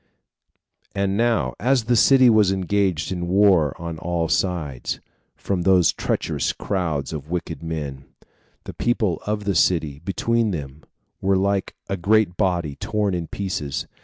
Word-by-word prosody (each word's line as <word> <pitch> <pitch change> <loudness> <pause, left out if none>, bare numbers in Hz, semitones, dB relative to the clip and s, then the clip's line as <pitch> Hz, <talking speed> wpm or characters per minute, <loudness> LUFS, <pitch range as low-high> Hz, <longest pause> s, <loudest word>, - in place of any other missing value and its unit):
5. - - -41
And 100 0 0
now, 115 - +1
as 125 +3 +2
the 120 +2 +1
city 130 +2 +6
was 110 -4 +5
engaged 95 -3 0
in 90 -2 -3
a - - -2
war 90 -5 +3
on 85 -1 -6
all 85 -1 -1
sides, 80 -9 -1 0.4
from 95 -3 -2
these 90 -2 +4
treacherous - - -1
crowds 80 -8 -2
of 75 -1 -7
wicked 85 -2 -4
men, 75 -5 -5 0.6
the - - -8
people 110 -7 0
of 105 0 -1
the 100 -1 0
city, 80 -4 +1
between 115 +4 0
them, 75 -5 -5 0.4
were 95 0 +2
like 100 0 0
a 100 - -2
great 100 0 +2
body 85 -7 0
torn 105 -2 -1
in 85 -2 -3
pieces. 75 -8 -3
90 Hz, 155 wpm, -22 LUFS, 80-100 Hz, 0.6 s, city